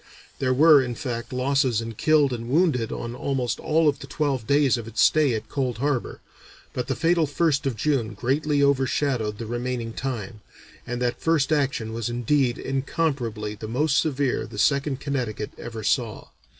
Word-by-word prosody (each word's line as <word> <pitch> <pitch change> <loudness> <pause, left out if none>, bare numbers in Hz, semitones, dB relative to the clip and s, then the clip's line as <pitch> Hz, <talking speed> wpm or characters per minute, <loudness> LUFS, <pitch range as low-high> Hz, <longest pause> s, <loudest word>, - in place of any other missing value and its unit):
There 130 -1 +1
were, 150 +2 +7
in 120 -2 -3
fact, 120 -3 -5
losses 130 -2 +1
in 115 0 -5
killed 145 +2 +3
and 115 0 -5
wounded 140 -6 +2
on 120 0 -5
almost 125 -1 -2
all 160 +1 +2
of 145 -2 +1
the 135 - -9
twelve 135 -5 -1
days 140 -2 +4
of 115 -2 -6
its 115 0 -6
stay 150 -6 +4
at 110 0 -5
Cold 130 -5 -2
Harbor, 140 -1 -2 0.5
but 125 -1 -3
the 135 - -1
fatal 165 -1 +2
1st 145 -1 +1
of 130 - -1
June 120 -2 0
greatly 145 +3 +1
overshadowed 130 -5 +1
the 115 - -5
remaining 120 0 -3
time, 115 -5 -5 0.5
and 120 0 -3
that 120 -1 -1
first 160 -3 +2
action 135 -6 -1
was 115 0 -3
indeed 120 +1 +1
incomparably 135 -6 -2
the 105 +1 -8
most 140 +6 +2
severe 140 -4 0
the - - -10
Second 140 +4 +1
Connecticut 125 -7 -3
ever 115 -2 -7
saw. 115 -3 -1
130 Hz, 175 wpm, -24 LUFS, 115-145 Hz, 0.5 s, were